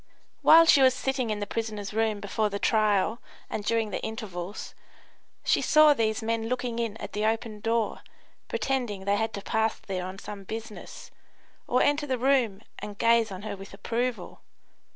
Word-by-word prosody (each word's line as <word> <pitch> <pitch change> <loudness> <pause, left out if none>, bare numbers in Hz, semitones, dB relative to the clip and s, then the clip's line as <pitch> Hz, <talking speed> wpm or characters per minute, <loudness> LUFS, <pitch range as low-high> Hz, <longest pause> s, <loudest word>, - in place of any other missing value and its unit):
While 330 +1 +8
she 290 -4 +6
was 260 -1 +5
sitting 265 -2 -1
in 210 -1 -2
the - - -1
prisoners' 210 -1 -4
room 220 -1 0
before 210 +1 -1
the 200 - -3
trial 215 +1 +2 0.3
and 210 - -3
during 225 0 0
the - - -3
intervals, 200 -4 -6 0.7
she - - +2
saw 305 -1 +6
these 220 -3 0
men 225 0 -1
looking 245 -2 -2
in 225 -2 -2
at - - -8
the 210 - -2
open 220 0 -1
door 225 0 -1 0.5
pretending 230 -4 -2
they 200 +1 +2
had 220 +1 -1
to 200 - -6
pass 220 +1 0
there 185 -2 -4
on 185 +1 -8
some 200 0 -8
business, 220 +1 -8 0.6
or 250 - +3
enter 295 +1 +1
the 260 -2 0
room 245 -6 +1 0.2
and 205 -1 -7
gaze 230 -1 +3
on 190 +1 -7
her 215 -2 -4
with 195 0 -11
approval. 235 +4 -3
220 Hz, 175 wpm, -27 LUFS, 205-235 Hz, 0.7 s, While